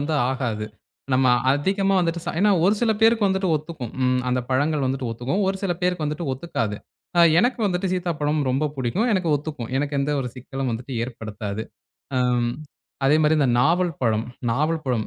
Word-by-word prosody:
வந்து 150 +2 -1 0.2
ஆகாது. 115 -5 -2 0.5
நம்ம 130 0 +3 0.3
அதிகமா 195 +7 +1
வந்துட்டு 170 -1 0
சா 175 - -2
ஏன்னா 205 0 +5
ஒரு 200 +3 +4
சில 225 -2 +3
பேருக்கு 225 -2 +4
வந்துட்டு 190 -1 0
ஒத்துக்கும். 150 -6 -7
ம் 125 0 +2
அந்தப் 125 0 -1
பழங்கள் 145 +2 +1
வந்துட்டு 130 -2 -2
ஒத்துக்கும். 125 - -1
ஒரு 195 - 0
சில 190 - +1
பேருக்கு 180 -3 0
வந்துட்டு 150 0 -3
ஒத்துக்காது. 115 -8 -3 0.4
அ - - +8 0.2
எனக்கு 245 +1 +2
வந்துட்டு 180 0 -1
சீத்தாப்பழம் 155 -4 -1
ரொம்ப 135 +4 0
புடிக்கும். 135 - 0
எனக்கு 185 -4 +1
ஒத்துக்கும். 145 -5 -6
எனக்கு 145 +1 -1
எந்த 140 +2 0
ஒரு 125 - -3
சிக்கலும் 130 0 -4
வந்துட்டு 125 +3 -5
ஏற்படுத்தாது. 110 -3 -6 0.5
ஆம் 125 -1 +2 0.5
அதே 145 +3 +5
மாரி 155 +1 +4
இந்த 140 -3 +3
நாவல் 170 +4 +2
பழம். 115 -2 +1 0.2
நாவல் 155 +6 0
பழம். 120 -5 -1
145 Hz, 175 wpm, -23 LUFS, 125-175 Hz, 0.5 s, அ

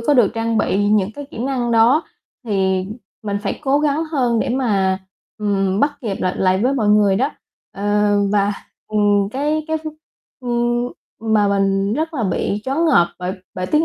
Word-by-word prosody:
có 285 +5 +2
được 235 -6 +4
trang 225 -1 0
bị 205 +1 +1
những 210 0 +2
cái 285 - -7
kỹ - - -9
năng 245 -1 -1
đó, 235 +7 +5 0.4
thì 190 -3 0 0.4
mình 205 -1 -2
phải 200 - -3
cố 280 +1 +2
gắng 300 +2 +1
hơn 255 -7 0
để - - -1
mà, 200 -7 +1 0.4
ừm, 195 -1 0
bắt 290 +1 +3
kịp 215 -7 -3
lại 185 0 0
lại 185 0 +2
với 260 +3 +2
mọi 220 -6 +1
người, 210 -2 +4
đó. 265 +7 +1 0.4
Ờ, 205 +1 +1 0.2
và, 205 0 +2 0.4
ừm, 205 -2 +2
cái 300 +3 -1
cái, 315 - +1
ưm, 310 -1 -5 1.3
ừm, 220 0 -2
mà 205 -1 +4
mình 195 0 +1
rất 320 +2 -2
là 255 - -1
bị 195 +2 -1
choáng 275 +6 0
ngợp 175 - +4
bởi 180 0 -3 0.2
bởi 185 -1 -3
tiếng 305 - +2
215 Hz, 185 wpm, -19 LUFS, 195-270 Hz, 1.3 s, đó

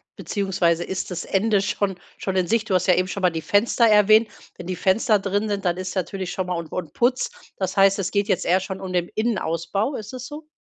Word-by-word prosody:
beziehungsweise 180 -4 0
ist 190 0 -4
das 175 -1 -4
Ende 200 +1 +2
schon 195 -2 -2 0.2
schon 190 -1 -3
in 180 - +1
Sicht? 225 +2 0
Du 190 - +1
hast 185 +1 +1
ja 180 - +5
eben 185 +1 0
schon 200 - -4
mal 180 -1 +3
die 160 - -4
Fenster 225 +6 +2
erwähnt. 215 +1 +5 0.3
Wenn 175 - -9
die 185 - -2
Fenster 205 +4 +2
drin 205 +2 -1
sind, 200 -2 -2
dann 175 -1 +2
ist 185 +1 -5
natürlich 185 0 -3
schon 185 -1 -3
mal 180 - -1
und 170 -2 -6
und 170 -5 -5
Putz. 250 +1 +1 0.3
Das 190 0 -2
heißt, 195 0 +4
es 185 -2 -2
geht 200 0 0
jetzt 185 - +1
eher 185 +2 +3
schon 190 0 -6
um 185 -1 -6
den 175 -1 0
Innenausbau. 200 - -1
Ist 215 +3 -7
das 255 0 -6
so? 300 +2 -9
195 Hz, 245 wpm, -23 LUFS, 180-210 Hz, 0.3 s, ja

